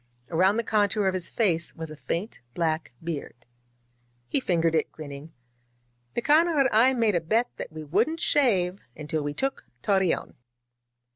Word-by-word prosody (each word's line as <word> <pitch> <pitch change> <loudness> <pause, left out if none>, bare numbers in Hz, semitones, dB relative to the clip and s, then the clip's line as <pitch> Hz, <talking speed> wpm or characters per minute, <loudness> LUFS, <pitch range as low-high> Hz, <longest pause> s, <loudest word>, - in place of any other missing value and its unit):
Around 185 +5 +3
the 230 - +1
contour 210 -1 +1
of 190 - +2
his 185 -2 -1
face 175 -7 0
was 160 -1 -6
a - - -7
faint 170 +7 -4 0.2
black 160 -3 -1
beard. 145 -7 -6 0.8
He - - +1
fingered 170 -8 +1
it, 160 - +1
grinning. 145 0 -9 0.8
^'Nicanor 310 +5 +3
and 260 - +3
I 230 +5 +5
made 225 -3 +2
a 170 - +1
bet 225 +9 +1
that - - -6
we 155 0 -7
wouldn't 220 - +1
shave 195 - +2 0.2
until 155 +1 -3
we 145 0 -3
took 270 - -2 0.2
Torreon. 190 -3 +1
185 Hz, 155 wpm, -26 LUFS, 160-230 Hz, 0.8 s, I